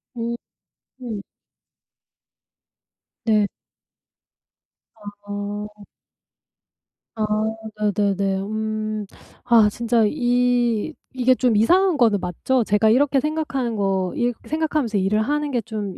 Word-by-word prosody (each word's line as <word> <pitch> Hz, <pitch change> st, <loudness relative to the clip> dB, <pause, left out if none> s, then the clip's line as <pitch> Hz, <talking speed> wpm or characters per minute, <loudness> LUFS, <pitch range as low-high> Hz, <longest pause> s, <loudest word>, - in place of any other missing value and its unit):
음. 235 Hz, 0 st, -3 dB, 0.7 s
음. 225 Hz, -4 st, -4 dB, 2.1 s
네. 215 Hz, -2 st, +3 dB, 1.5 s
아. 205 Hz, 0 st, -7 dB, 1.3 s
아. 220 Hz, -, -1 dB, 0.7 s
네네네. 195 Hz, -2 st, 0 dB
음. 215 Hz, 0 st, -3 dB, 0.4 s
아 230 Hz, -4 st, +5 dB
진짜 235 Hz, +1 st, +1 dB
이 245 Hz, 0 st, +1 dB, 0.2 s
이게 255 Hz, 0 st, +3 dB
좀 245 Hz, -3 st, +2 dB
이상한 355 Hz, -, +4 dB
거는 225 Hz, -6 st, +3 dB
맞죠? 210 Hz, +9 st, 0 dB
제가 210 Hz, +1 st, +3 dB
이렇게 275 Hz, +3 st, +3 dB
생각하는 275 Hz, -5 st, -2 dB
거, 195 Hz, -3 st, 0 dB
이렇게 240 Hz, -1 st, -2 dB
생각하면서 305 Hz, -8 st, 0 dB
일을 205 Hz, +3 st, +1 dB
하는 295 Hz, +5 st, -1 dB
게 245 Hz, -3 st, 0 dB
좀 210 Hz, -4 st, -5 dB
225 Hz, 175 characters per minute, -22 LUFS, 205-250 Hz, 2.1 s, 아